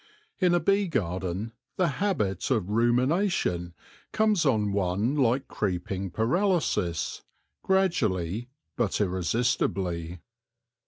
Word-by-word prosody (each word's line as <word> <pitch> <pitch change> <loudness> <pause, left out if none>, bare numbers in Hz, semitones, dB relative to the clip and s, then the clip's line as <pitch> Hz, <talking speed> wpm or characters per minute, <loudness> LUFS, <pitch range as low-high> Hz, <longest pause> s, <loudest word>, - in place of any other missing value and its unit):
In 180 -2 +4
a - - +3
bee 195 +2 +2
garden 95 - -2 0.3
the 180 - +3
habit 105 - 0
of 105 -7 0
rumination 120 - +1 0.4
comes 215 -7 +2
on 105 -5 +2
one 100 +7 0
like 130 -1 +2
creeping 95 0 -2
paralysis, 115 - 0 0.4
gradually 120 - 0 0.3
but 115 -5 0
irresistibly. 95 -3 0
110 Hz, 95 wpm, -27 LUFS, -, 0.4 s, In